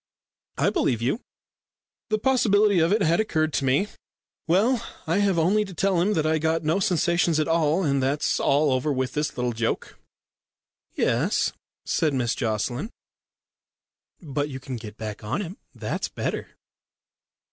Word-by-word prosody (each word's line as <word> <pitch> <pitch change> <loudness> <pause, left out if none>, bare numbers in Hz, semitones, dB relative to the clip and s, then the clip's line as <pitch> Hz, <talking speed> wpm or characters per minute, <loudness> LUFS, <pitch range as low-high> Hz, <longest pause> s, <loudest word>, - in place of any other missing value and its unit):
"I - - +2
believe 120 - +1
you. 135 - -1 0.9
The 215 - +2
possibility 210 -5 +3
of 165 +2 +3
it 215 - +3
had 165 +2 +3
occurred 155 -8 0
to 135 - 0
me. 135 +10 +2 0.6
Well, 215 +8 +3 0.2
I 165 +5 +1
have 200 -3 +2
only 190 +6 +3
to 195 -3 -9
tell 190 -1 +2
him 205 +4 +2
that 155 -4 0
I 155 0 +2
got 160 +1 0
no 160 +5 +1
sensations 170 -3 +2
at 155 - +1
all, 165 +2 +2
and 140 -4 +1
that's 140 +3 0
all 145 +1 +3
over 130 +3 +1
with 130 -2 -1
this 150 -2 -2
little 125 -1 -1
joke." 115 0 -3 1.0
"Yes," - - +1 0.3
said 155 -4 +1
Miss 120 -3 0
Jocelyn, 120 - -2 1.3
"but 145 -2 -3
you 135 -1 -6
can 130 0 -6
get 110 -2 -9
back 105 -2 -6
on 130 - -2
him. 190 -1 -6 0.2
That's - - -3
better." - - -3
155 Hz, 160 wpm, -25 LUFS, 135-190 Hz, 1.3 s, possibility